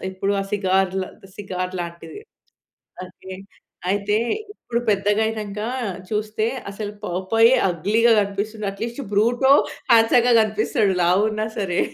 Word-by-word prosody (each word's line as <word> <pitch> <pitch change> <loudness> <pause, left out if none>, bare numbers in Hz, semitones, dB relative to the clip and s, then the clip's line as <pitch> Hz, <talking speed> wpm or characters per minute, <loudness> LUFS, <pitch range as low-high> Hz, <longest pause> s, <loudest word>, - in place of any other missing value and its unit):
ఇప్పుడు 195 +1 -2
ఆ - - -1
సిగార్‌ల 190 -1 +1 0.3
సిగార్ 185 -2 -4
లాంటిది. 170 - -8 0.8
అయితే 185 +1 -11 0.6
అయితే 205 +1 0 0.4
ఇప్పుడు 235 - -4
పెద్దగా 205 +1 +1
అయినంక 210 -2 -4 0.5
చూస్తే 215 +1 -1 0.2
అసలు 205 +1 -6
పాపయ్ 190 +6 +3 0.2
అగ్లీ‌‌గా 215 +8 +2
కనిపిస్తుంది. 205 +2 -3
అట్లీస్ట్ 230 +6 -5
బ్రూటొ 240 +6 +3 0.4
హాండ్సమ్‌గా 235 +2 +5
కనిపిస్తాడు 215 -2 +1
లావున్నా 215 +5 +2
సరే. 185 -3 0
205 Hz, 105 wpm, -22 LUFS, 190-220 Hz, 0.8 s, హాండ్సమ్‌గా